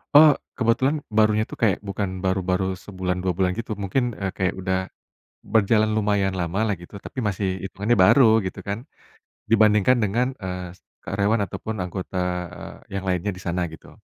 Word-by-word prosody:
Oh 150 -1 +9 0.2
kebetulan 125 +5 +2 0.2
barunya 110 0 +3
itu - - -8
kayak 105 -5 +2
bukan 100 -1 -2
baru-baru 95 0 0
sebulan 90 -2 -3
2 95 - +1
bulan 90 +1 +1
gitu 115 -1 -5
mungkin, 120 +5 0
eee, 95 -1 -2
kayak 95 -2 +1
udah, 95 0 0 0.8
berjalan 110 0 +3
lumayan 100 -2 +1
lama 90 +2 -2
lah 105 - +1
gitu 95 +4 -10
tapi 130 +6 -6
masih 95 -3 -1
hitungannya 100 +4 -1
baru 115 -2 +6
gitu 95 - -5
kan, 100 +1 -2 0.7
dibandingkan 110 +2 +4
dengan, 120 +6 0
eee, 90 -1 -5 0.3
karyawan 105 +2 +1
ataupun 110 +4 -5
anggota 90 +1 -5 0.7
yang 95 0 -4
lainnya 90 +2 0
di - - -10
sana 85 +1 -1
gitu. - - -15
100 Hz, 155 wpm, -24 LUFS, 95-110 Hz, 0.8 s, Oh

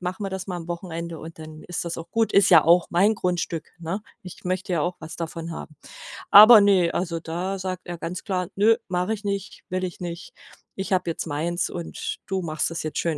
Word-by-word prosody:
machen 185 +3 -4
wir 195 - -3
das 190 +1 -5
mal 180 - -3
am 170 -1 -7
Wochenende, 170 -1 -5
und 160 +1 -10
dann 155 0 -10
ist 175 -1 -4
das 170 - -4
auch 165 - -8
gut. 225 -1 +1
Ist 200 - +5
ja 165 -4 +8
auch 170 +1 +5
mein 200 +6 +3
Grundstück, 175 -4 -2
ne? 175 +5 -4 0.2
Ich 180 - -10
möchte 185 +1 -2
ja 170 - +1
auch 175 +3 -1
was 160 - -9
davon 165 0 -5
haben.‟ 155 -1 -9 0.5
Aber, 215 +2 +10
ne, 190 -4 +4
also 170 -2 -2
da 175 +4 -3
sagt 185 -1 -5
er 175 -1 -5
ganz 170 +2 -5
klar: 185 -4 -2
„Ne, 220 +3 +4
mache 180 +4 0
ich 210 - -13
nicht, 200 -1 -4
will 185 0 -2
ich 180 -2 -5
nicht. 170 -1 -6 0.5
Ich 190 0 -2
habe 180 -2 +1
jetzt 165 - -3
meins, 165 +3 -2
und 170 -2 -5
du 190 -1 -2
machst 155 -2 -1
das 165 - -5
jetzt 155 - -3
schön 165 -3 -1
175 Hz, 230 wpm, -24 LUFS, 165-190 Hz, 0.5 s, Aber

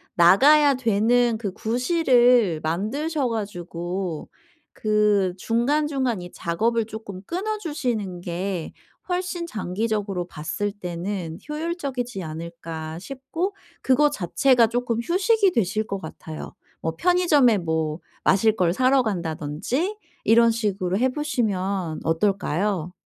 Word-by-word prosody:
나가야 280 - +6
되는 235 0 +2
그 200 -5 -4
구실을 245 - +3
만드셔 255 - -1
가지고 175 -5 -4 0.5
그 210 -3 +2
'중간중간 260 0 0
이 175 - -9
작업을 225 +7 0
쪼끔 215 -4 -8
끊어 425 +5 -2
주시는 235 - -3
게 180 0 -4 0.4
훨씬 360 -1 -2
장기적으로 205 - -2
봤을 165 +6 -3
때는 180 -3 -5
효율적이지 280 - -3
않을까?' 160 0 -6
싶고 275 - -4 0.3
그거 280 +3 +4
자체가 245 - +3
쪼끔 240 0 -1
휴식이 395 - +3
되실 215 0 0
것 195 - -3
같아요. 160 -1 -8 0.3
뭐 160 0 -2
편의점에 330 - +4
뭐 160 -2 -1 0.2
마실 215 +3 +4
걸 175 -4 +2
사러 260 +4 +3
간다든지 180 - -2 0.3
이런 230 +1 +6
식으로 200 -5 -1
해 260 +2 +3
보시면 200 - -1
어떨까요? 180 0 0
215 Hz, 250 characters per minute, -24 LUFS, 180-260 Hz, 0.5 s, 나가야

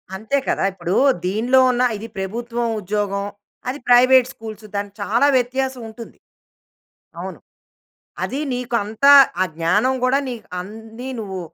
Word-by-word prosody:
అంతే 220 +8 -1
కదా! - - 0
ఇప్పుడు 180 0 -3 0.3
దీనిలో 230 +8 +2
ఉన్న 250 0 +1
ఇది 220 +2 -8
ప్రభుత్వం 235 +5 -3
ఉద్యోగం, 200 0 -2 0.4
అది 270 +3 -4
ప్రైవేట్ 255 +1 +6
స్కూల్స్ 220 -1 -10
దానికి 200 0 -4
చాలా 235 +8 +2
వ్యత్యాసం 260 +1 -2
ఉంటుంది. 225 +1 -11 1.0
అవును. - - -7 0.8
అది 275 - -3
నీకు 245 0 -3
అంత 215 +6 -3 0.4
ఆ - - +4
జ్ఞానం 205 +10 +2
గూడా 260 +2 +3
నీకు 235 -4 -7
అన్ని 225 +6 -9
నువ్వు 190 -3 -5
225 Hz, 130 wpm, -20 LUFS, 205-250 Hz, 1.0 s, ప్రైవేట్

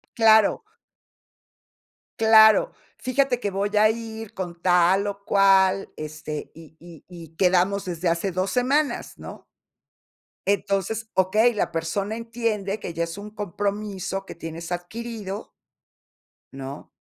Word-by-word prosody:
Claro. 220 - +5 1.6
Claro, 220 - +6 0.3
"Fíjate 255 -1 0
que 205 - -2
voy 200 +2 -2
a 215 +1 +6
ir 225 -1 -6
con 175 -2 -6
tal 180 +3 +3
o 200 0 -6
cual, 195 -1 +3
este, 155 0 -6
y 160 -1 -14
y 170 -3 -14
y 165 -3 -12
quedamos 185 +2 +2
desde 175 -1 -3
hace 170 +3 0
2 185 +2 -1
semanas", 275 +4 0
¿no? - - -10 1.0
Entonces, 200 +2 -1
okey, 210 +6 +3
la 205 - -1
persona 180 +6 -2
entiende 225 -3 -3
que 175 - -6
ya 170 +1 -1
es 165 +3 -8
un 205 +1 -8
compromiso 200 -1 -3
que - - -8
tienes 165 +1 -7
adquirido. 210 +3 -6 1.0
¿No? 135 +1 -8
195 Hz, 125 wpm, -24 LUFS, 175-220 Hz, 1.6 s, Claro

